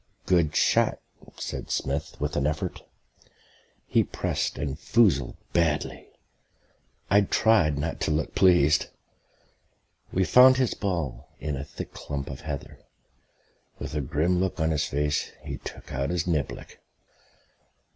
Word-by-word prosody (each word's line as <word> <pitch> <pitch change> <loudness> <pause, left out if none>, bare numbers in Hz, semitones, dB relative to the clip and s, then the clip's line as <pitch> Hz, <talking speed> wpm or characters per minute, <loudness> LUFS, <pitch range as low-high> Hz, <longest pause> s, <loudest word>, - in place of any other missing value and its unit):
"Good 85 -4 +2
shot," - - +3 0.4
said - - -5
Smith 70 +1 -2
with 75 +1 -2
an 70 0 +1
effort. 75 0 -3 1.0
He - - +3
pressed - - -2
and 70 +1 -3
foozled 80 - +2 0.2
badly. 80 -3 0 1.0
I 100 +1 +6
tried 100 -7 +3
not 80 +3 -3
to - - 0
look 75 0 -1
pleased. 75 -5 +4 1.2
We 95 - +2
found 130 +4 +7
his 130 -3 +1
ball 85 - -3
in 75 -1 -3
a 70 - -4
thick - - -8
clump 70 -1 -5
of 65 - -8
heather. 75 -3 -6 1.0
With - - -6
a 75 - -1
grim 80 +7 +1
look 95 -1 -1
on 80 0 +1
his 75 0 +1
face, 75 +1 -1
he - - -5
took - - -9
out 70 +1 -1
his 90 -1 -1
niblick.... 80 -6 -3
75 Hz, 135 wpm, -26 LUFS, 75-90 Hz, 1.2 s, found